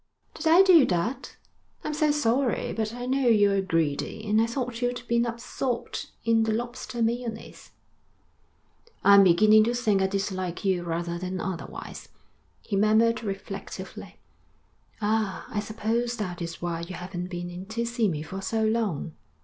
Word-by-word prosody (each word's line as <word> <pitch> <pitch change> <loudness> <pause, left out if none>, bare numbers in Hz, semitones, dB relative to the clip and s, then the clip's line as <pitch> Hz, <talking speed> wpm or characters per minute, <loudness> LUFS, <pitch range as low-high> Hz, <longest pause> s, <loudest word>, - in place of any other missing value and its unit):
'Did 320 - -4
I 340 +4 +7
do 360 -6 +7
that? 190 +9 -2 0.5
I'm 305 - -3
so 305 0 +2
sorry. 265 -3 +1
But 220 -1 -2
I 245 +1 -6
know 265 0 +1
you're 205 -3 +4
greedy, 165 +4 -1
and 215 +1 +3
I 225 - +2
thought 240 -1 -4
you'd 245 0 -1
be 235 0 +2
absorbed 240 +1 -3 0.2
in 230 -1 +4
the 220 0 +1
lobster 240 0 -3
mayonnaise.' 230 -1 -4 1.3
'I'm 200 0 +8
beginning 215 +4 +6
to 240 +1 0
think 215 -5 +2
I 190 - +3
dislike 190 -2 -3
you 190 -2 +2
rather 170 0 -3
than 185 +1 -4
otherwise,' 185 -2 -6 0.5
he 205 - -3
murmured 220 +3 +3
reflectively. 195 -1 -7 0.9
'Ah, 215 -2 0
I 210 - -2
suppose 225 +3 -2
that 180 -4 -4
is 170 0 -6
why 170 -1 -2
you 175 +2 -6
haven't 180 0 -5
been 175 -1 -5
in 180 +2 -8
to 230 +2 -2
see 235 -1 0
me 155 -5 -2
for 190 +4 -6
so 220 +3 -1
long.' 215 -8 -1
215 Hz, 155 wpm, -26 LUFS, 185-235 Hz, 1.3 s, I'm